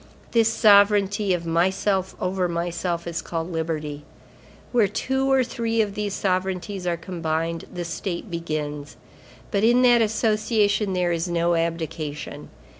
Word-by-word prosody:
This 225 -1 +3
sovereignty 205 -2 +4
of 175 -2 0
myself 190 +3 +1
over 185 0 0
myself 170 0 -2
is 165 -1 -3
called 165 +1 -4
Liberty. 155 -3 -3 0.7
Where 235 -4 +4
two 265 +6 -1
or 265 -1 +4
three 230 -2 -2
of 210 -2 +1
these 205 -1 -3
sovereignties 185 0 -2
are 170 -1 0
combined, 165 -1 -3
the 175 -1 -5
state 175 +3 -4
begins. 150 -3 -4 0.5
But 200 0 +1
in 240 +3 +5
that 240 -1 +6
association 215 -2 +1
there 180 -1 +1
is 165 +1 -1
no 170 0 +1
abdication. 165 -3 -3
180 Hz, 135 wpm, -24 LUFS, 170-210 Hz, 0.7 s, that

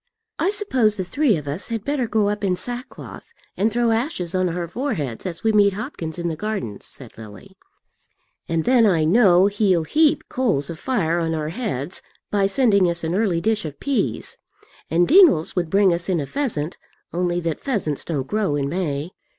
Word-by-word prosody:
"I 335 +5 +2
suppose 260 - +1
the 190 - -1
three 230 - +1
of 150 -1 -8
us 150 +7 -3
had 225 -2 -4
better 280 -4 0
go 215 -2 +1
up 210 0 -2
in 185 -2 +1
sackcloth, 245 - -8 0.2
and 215 +3 +1
throw 235 +1 +1
ashes 225 - -2
on 185 -1 +1
our 170 0 -3
foreheads 175 - -3
as 170 -2 -6
we 225 - +3
meet 205 -2 +4
Hopkins 190 - -6
in 170 0 -2
the 165 - -2
garden," 160 - -4
said - - -9
Lily, 110 - -12 0.9
"and 165 -1 0
then 245 -3 +5
I 170 -5 +2
know 185 +1 +5
he'll 200 -4 +2
heap 305 - +2
coals 200 - 0
of 160 - -9
fire 175 -10 0
on 165 -1 -1
our 155 -1 -3
heads 175 - -4 0.3
by 200 -1 +2
sending 200 -5 +3
us 170 0 -3
an 165 +1 -1
early 190 -4 +1
dish 220 +3 0
of 150 -3 -7
peas. 220 - -2 0.5
And 170 +3 +3
Dingles 320 - +5
would 175 -3 -1
bring 195 -1 +4
us 170 +2 -3
in 180 -3 +1
a 145 - -2
pheasant, 170 - -3 0.3
only 175 0 0
that 165 -2 -2
pheasants 195 - -2
don't 145 -6 -3
grow 205 -2 -1
in 140 -1 -1
May." 160 -2 -2
185 Hz, 190 wpm, -22 LUFS, 165-225 Hz, 0.9 s, then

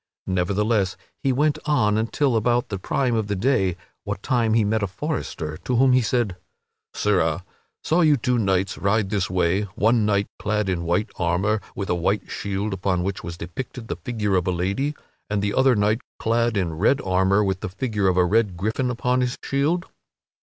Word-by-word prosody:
Nevertheless, 95 +2 0 0.2
he 135 - +2
went 150 +3 +1
on 105 -9 +3
until 115 +4 +1
about 120 +2 +1
the 100 -3 -3
prime 125 +5 0
of 110 -2 0
the 105 - -1
day, 95 -5 +1 0.3
what 95 - -5
time 115 -5 +2
he 115 - +4
met 110 +1 +1
a 100 - 0
forester, 90 - -4
to 125 - -2
whom 130 +1 +5
he 130 - +5
said: 115 -5 0 0.6
"Sirrah, 90 -4 +1 0.4
saw 165 +3 +2
you 155 -3 +5
two 125 0 0
knights 95 -2 0
ride 100 0 +1
this 100 -3 0
way 90 +1 +1
one 115 +1 +3
knight 100 -1 +2
clad 105 -1 0
in 85 -2 -1
white 90 +6 0
armor 95 +5 +1
with 100 - -3
a - - +3
white 95 +4 -1
shield 100 +1 -2
upon 90 -1 0
which 95 +1 -3
was 85 -1 -6
depicted 115 +7 -7
the - - -1
figure 105 -5 -2
of 90 -1 +1
a - - +2
lady, 100 - -1 0.3
and 105 0 0
the 100 0 0
other 130 -1 +4
knight 105 +3 +1 0.2
clad 115 -1 +1
in 85 -5 -2
red 130 +8 +3
armor 95 +2 +2
with 95 -2 -1
the - - -4
figure 105 0 -1
of 90 -1 +2
a 90 - +5
red 100 -1 +1
gryphon 110 +7 -1
upon 125 +1 0
his 125 0 -1
shield?" 155 +6 0
105 Hz, 195 wpm, -23 LUFS, 95-120 Hz, 0.6 s, whom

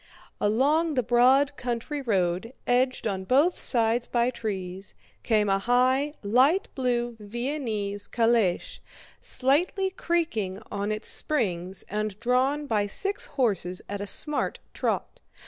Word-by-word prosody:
Along 290 +9 +2
the 250 - +1
broad 260 +5 +4
country 245 +4 -3
road, 195 -1 -1
edged 255 +1 +1
on 195 -3 -2
both 280 - +3
sides 235 0 +1
by 240 +1 +1
trees, 195 -5 -5 0.3
came 215 -3 +2
a 195 0 +2
high, 255 +6 +2
light 260 - +3
blue 240 -3 -1
Viennese 215 -3 -3
calèche, 230 -6 +1 0.4
slightly 350 +9 +1
creaking 320 - -1
on 200 +1 -2
its 215 +1 -2
springs 190 - 0
and 210 0 -3
drawn 260 +5 +1
by 210 -6 0
six 395 - -1
horses 195 -8 -1
at 200 0 -5
a 205 - -4
smart 300 +9 +1 0.2
trot. - - -2
240 Hz, 125 wpm, -26 LUFS, 205-275 Hz, 0.4 s, broad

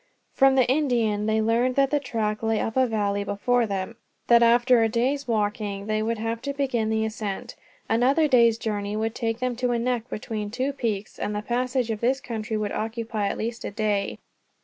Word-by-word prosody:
From 270 0 +5
the 260 -3 +4
Indian 240 -7 +1
they 220 0 +2
learned 240 +3 +2
that 275 -1 +3
the 295 - +2
track 220 -5 -2
lay 225 -1 +1
up 225 - -2
a 260 -1 +4
valley 205 -3 0
before 230 +4 +1
them, 200 +3 -4 0.3
that 235 0 +7
after 240 +1 +5
a 225 - +3
day's 255 +5 0
walking 205 -2 -1
they 215 0 0
would 230 +1 -1
have 225 +1 -3
to 280 +1 -3
begin 260 -6 -1
the 220 0 +1
ascent. 215 -3 -5 0.3
Another 265 +7 +3
day's 235 -5 +5
journey 205 -2 -3
would 220 +1 -1
take 225 -1 -2
them 250 0 -2
to 250 0 0
a - - +1
neck 245 0 -1
between 215 -1 -4
two 260 +5 -2
peaks, 220 -6 -3
and 210 - -2
the 210 - -3
passage 245 0 -1
of 215 - -3
this 260 +3 +2 0.3
would 215 -2 -1
occupy 220 -1 -2
at - - -2
least 230 +1 -4
a - - -3
day. 205 -1 -1
225 Hz, 200 wpm, -25 LUFS, 215-250 Hz, 0.3 s, that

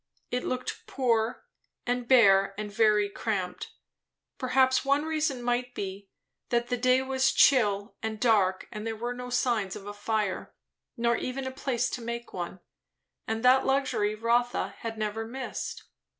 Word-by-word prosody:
It 250 0 -1
looked 255 0 -4
poor 230 -3 0 0.4
and 245 0 -1
bare, 195 -6 +5
and 210 -1 -5
very 210 -1 +3
cramped. 200 -3 -3 0.7
Perhaps 260 0 +3
one 280 +2 +2
reason 310 -5 -1
might 245 +1 -1
be, 195 0 -6 0.4
that 240 -1 0
the 245 - 0
day 255 +2 +3
was 265 0 +2
chill 205 -5 +3
and 220 -1 -4
dark 200 -6 +2
and 215 +1 -5
here 225 - -2
were 240 +3 -3
no 250 0 -7
signs 235 -5 0
of 195 - -9
a 205 - -6
fire, 205 -2 -2 0.4
nor 235 0 +2
even 260 +1 -4
a 260 - -3
place 260 -2 -1
to 245 - -4
make 235 +1 -5
one; 180 +1 -5 0.7
and 225 +2 -2
that 255 +1 +6
luxury 265 -6 +1
Rotha 235 +2 +1
had 225 -1 -5
never 215 +1 -2
missed. 255 +3 -5
235 Hz, 155 wpm, -28 LUFS, 210-255 Hz, 0.7 s, that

